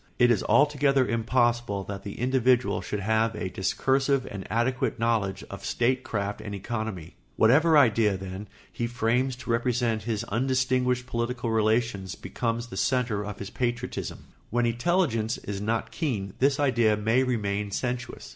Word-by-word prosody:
It 120 -1 +5
is 110 - +2
altogether 140 +1 +4
impossible 115 -3 +1
that 100 0 -6
the 100 - -7
individual 125 0 +2
should 105 - -4
have 110 +2 +1
a 95 -2 -3
discursive 135 +9 +1
and 100 -1 -6
adequate 120 +3 0
knowledge 110 -4 0
of 100 - -8
statecraft 120 -5 -1
and 100 -1 -6
economy. 100 -5 -5 0.2
Whatever 150 +8 +5
idea, 110 -7 +4
then, 95 +2 -7 0.2
he 120 - -2
frames 120 +2 0
to 125 -1 -5
represent 115 -1 +1
his 110 0 -2
undistinguished 125 +1 0
political 120 0 -2
relations 110 -3 0
becomes 115 0 -3
the 95 - -7
centre 115 -1 0
of 105 -1 -6
his 100 - -7
patriotism. 120 0 -3 0.2
When 120 +1 +1
intelligence 120 -2 +1
is 100 -1 -6
not 110 +2 -1
keen 105 - -2
this 140 +1 +3
idea 120 -6 +3
may 110 +4 +2
remain 105 -5 -1
sensuous. 120 +4 -4
115 Hz, 145 wpm, -27 LUFS, 105-125 Hz, 0.2 s, It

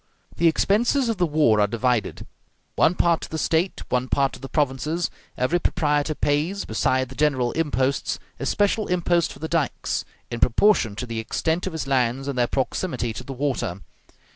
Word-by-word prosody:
The 170 - +4
expenses 235 - +2
of 225 - -1
the 175 - +2
war 145 -9 +3
are 105 - +4
divided, 115 -1 -1 0.5
one 175 - +3
part 170 -2 +2
to - - -7
the 160 - -4
State, 165 +4 0
one 125 +1 0
part 135 -1 +1
to - - -9
the 135 +1 -8
provinces; 150 +3 0 0.3
every 130 +8 +1
proprietor 150 -3 0
pays, 155 +9 0
beside 130 +3 0
the - - -9
general 130 -5 +1
imposts, 140 -4 0 0.2
a 135 - -3
special 205 +4 +1
impost 175 -1 +1
for - - -11
the 160 - -5
dikes, 165 -3 -1 0.3
in 120 - -3
proportion 120 - +3
to 125 - -4
the 115 -2 -4
extent 160 +10 -1
of 185 - -4
his 160 - -3
lands 130 0 0
and 140 - -2
their 120 -1 +2
proximity 130 -2 -2
to - - -7
the 140 - -8
water. 130 -9 -2
145 Hz, 185 wpm, -24 LUFS, 125-170 Hz, 0.5 s, The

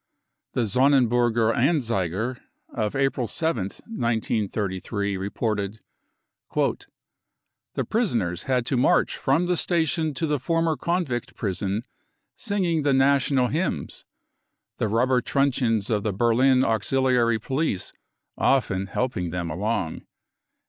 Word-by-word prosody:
The - - 0
Sonnenburger 120 -1 +3
Anzeiger 120 - 0 0.3
of 105 -2 -2
April 135 -2 0
7th, 115 - -2
1 225 - -8
933, 105 -3 -1
reported: 100 +1 -2 0.7
44 - - -1 0.8
The - - -1
prisoners 115 - 0
had 125 -2 +2
to 130 - 0
march 125 - +3
from 145 +7 +1
the 180 0 +1
station 160 -3 0
to 165 - -1
the 150 -2 0
former 165 +3 +1
convict 170 -8 -2
prison 100 +1 -2 0.5
singing 185 -7 0
the 140 -2 +2
national 135 -1 +3
hymns. 155 - -2 0.7
the - - 0
rubber 125 +4 +2
truncheons 125 -6 +1
of 105 -2 +1
the 105 -1 -1
Berlin\uxiliary 120 +1 +2
police 130 - -2 0.5
often 100 -8 +1
helping 95 -5 -2
them 85 -1 -3
along." 100 -1 -2
120 Hz, 110 wpm, -25 LUFS, 105-140 Hz, 0.8 s, Sonnenburger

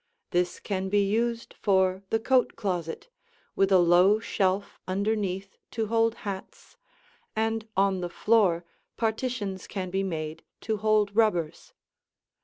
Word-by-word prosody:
This 175 0 0
can 190 -2 -3
be 205 +1 +3
used 230 +3 -1
for 190 -2 +2
the 225 - +2
coat 255 +2 +2
closet, 180 - -3 0.5
with 195 0 +2
a 190 - +7
low 180 +4 +5
shelf 195 -2 -1
underneath 195 -1 -2
to 225 -1 -2
hold 230 0 +2
hats; 195 - -7 0.6
and 225 0 -1
on 195 -1 +2
the 175 - -3
floor 185 -4 +2 0.3
partitions 220 -4 -2
can 185 -3 -4
be 190 +1 0
made 160 -4 -4 0.2
to 220 -1 -1
hold 210 -1 +2
rubbers. 190 -8 +1
200 Hz, 130 wpm, -27 LUFS, 185-220 Hz, 0.6 s, a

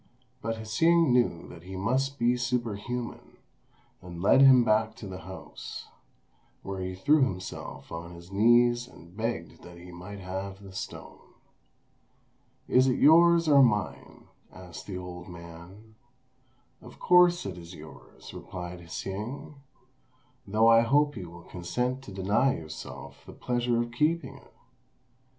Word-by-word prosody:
But 115 +1 -2
Hsing 160 +9 +3
knew 120 -9 +1
that 85 - -11
he 95 +2 -9
must 130 +8 0
be 120 0 +2
superhuman, 120 -1 -4 0.6
and 90 -1 -9
led 100 +9 +5
him 130 -3 +8
back 110 -1 +1
to 105 - -9
the 95 -1 -7
house, 95 0 -9 0.7
where 95 -1 -5
he 95 0 -4
threw 145 +11 +3
himself 95 -8 -4
on 85 +1 -7
his 85 +2 -13
knees 120 +4 +4
and 85 -6 -16
begged 110 -6 -4
that 90 0 -12
he 90 +1 -12
might 90 +4 -9
have 95 +1 -6
the 95 -1 -11
stone. - - -9 1.3
"Is 130 +1 +4
it 130 - +2
yours 170 +2 +6
or 140 -2 +7
mine?" 105 -6 0 0.3
asked 90 -3 -11
the 95 -3 -5
old 90 -1 -8
man. 85 +5 -12 0.9
"Of - - -13
course 180 -1 +4
it 95 -3 -4
is 85 0 -11
yours," 80 0 -13
replied 90 -1 -8
Hsing, 105 - -6 0.9
"though 110 +3 +3
I 115 0 +7
hope 145 +5 +2
you 90 -6 -7
will 85 0 -13
consent 125 +11 -3
to - - -9
deny 100 +8 +1
yourself 80 -1 -9
the - - -10
pleasure 120 -1 -1
of 120 0 -2
keeping 145 +1 0
it." - - -22
105 Hz, 140 wpm, -28 LUFS, 90-125 Hz, 1.3 s, him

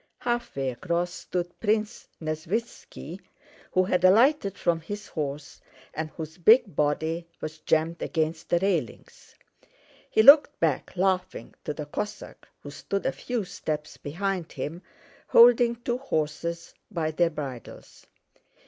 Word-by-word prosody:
Halfway 240 - -2
across 170 +6 -2
stood 175 -1 -5
Prince 215 +1 -1
Nesvítski, 165 +2 -5 0.5
who 185 - +4
had 185 0 0
alighted 205 +1 +4
from 170 -2 0
his 205 +5 -6
horse 145 -2 -5 0.3
and 155 0 -4
whose 160 +2 -8
big 215 - +5
body 160 +3 0
was 155 0 -6
jammed 160 +2 0
against 160 -1 -2
the 175 - +3
railings. 195 +3 -3 0.7
He 220 - +4
looked 285 +4 +8
back 160 +2 -1
laughing 185 0 -1
to - - -2
the 150 - -5
Cossack 210 +8 -6 0.2
who 145 - -8
stood 195 +6 -4
a - - +2
few 245 -3 -3
steps 155 -4 -5
behind 180 +3 -3
him 165 +4 -5 0.5
holding 235 0 +6
two 240 +1 -3
horses 170 - -3 0.2
by 165 -6 -2
their 170 +2 +2
bridles. 135 -7 -9
175 Hz, 130 wpm, -26 LUFS, 155-205 Hz, 0.7 s, looked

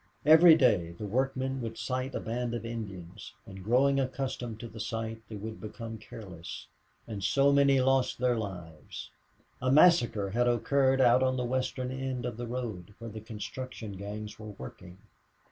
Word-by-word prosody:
Every 160 +2 +9
day 105 - +3
the 95 +5 -7
workmen 130 +4 -1
would 115 -1 -5
sight 130 +1 -3
a - - -1
band 120 +1 -3
of 115 - -5
Indians, 100 -5 -7
and, 95 -3 -10
growing 135 +6 +3
accustomed 130 -4 -3
to 120 - -6
the 110 0 -11
sight, 115 +1 -4
they 110 - -6
would 110 +2 -7
become 115 +1 -7
careless, 95 -6 -9 0.4
and 105 -4 -5
so 140 +7 +4
many 140 -1 +5
lost 130 0 +2
their 125 0 +2
lives. 90 -8 -7 0.5
A 130 0 +1
massacre 125 - +5
had 120 +3 +2
occurred 130 +3 +3
out 125 0 +6
on 130 0 +2
the 125 - -1
western 130 0 -2
end 130 -1 -3
of 120 -3 -4
the 120 0 -4
road, 110 -6 -5
where 115 -1 -8
the 110 +1 -7
construction 110 +1 -6
gangs 105 +2 -7
were 110 -1 -8
working. 90 +7 -10
120 Hz, 170 wpm, -30 LUFS, 105-130 Hz, 0.5 s, Every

